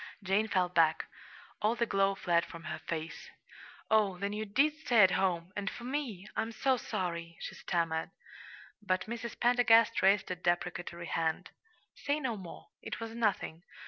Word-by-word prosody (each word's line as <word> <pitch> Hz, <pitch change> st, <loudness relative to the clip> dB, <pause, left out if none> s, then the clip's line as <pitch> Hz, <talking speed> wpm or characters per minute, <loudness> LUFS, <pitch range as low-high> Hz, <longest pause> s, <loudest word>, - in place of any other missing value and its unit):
Jane 200 Hz, +3 st, +2 dB
fell 185 Hz, -3 st, +2 dB
back. 165 Hz, -2 st, +3 dB, 0.6 s
All 215 Hz, +2 st, +2 dB
the 235 Hz, -, +1 dB
glow 195 Hz, -2 st, +2 dB
fled 170 Hz, -3 st, +2 dB
from 165 Hz, 0 st, -10 dB
her -, -, -5 dB
face. 160 Hz, 0 st, -5 dB, 0.6 s
"Oh, 210 Hz, -4 st, +3 dB
then 200 Hz, +2 st, -2 dB
you 215 Hz, +1 st, -3 dB
did 275 Hz, +9 st, +3 dB
stay 245 Hz, -8 st, +3 dB
at 190 Hz, -, +6 dB
home 185 Hz, -1 st, 0 dB
and 205 Hz, -1 st, -2 dB
for 235 Hz, -, -9 dB
me! 245 Hz, -8 st, -4 dB
I'm 220 Hz, +1 st, -1 dB
so 260 Hz, +4 st, +2 dB
sorry," 175 Hz, -7 st, -4 dB
she -, -, -6 dB
stammered. 165 Hz, -2 st, -1 dB, 0.7 s
But 185 Hz, -3 st, 0 dB
Mrs. 235 Hz, +1 st, -6 dB
Pendergast 230 Hz, -2 st, +5 dB
raised 195 Hz, 0 st, +3 dB
a -, -, -1 dB
deprecatory 175 Hz, -1 st, -2 dB
hand. 160 Hz, -1 st, -1 dB, 0.4 s
"Say 290 Hz, +1 st, -1 dB
no 260 Hz, -6 st, -2 dB
more. 185 Hz, -5 st, -10 dB
It -, -, -6 dB
was 225 Hz, -1 st, -5 dB
nothing. 210 Hz, -7 st, -1 dB
195 Hz, 165 wpm, -32 LUFS, 175-230 Hz, 0.7 s, at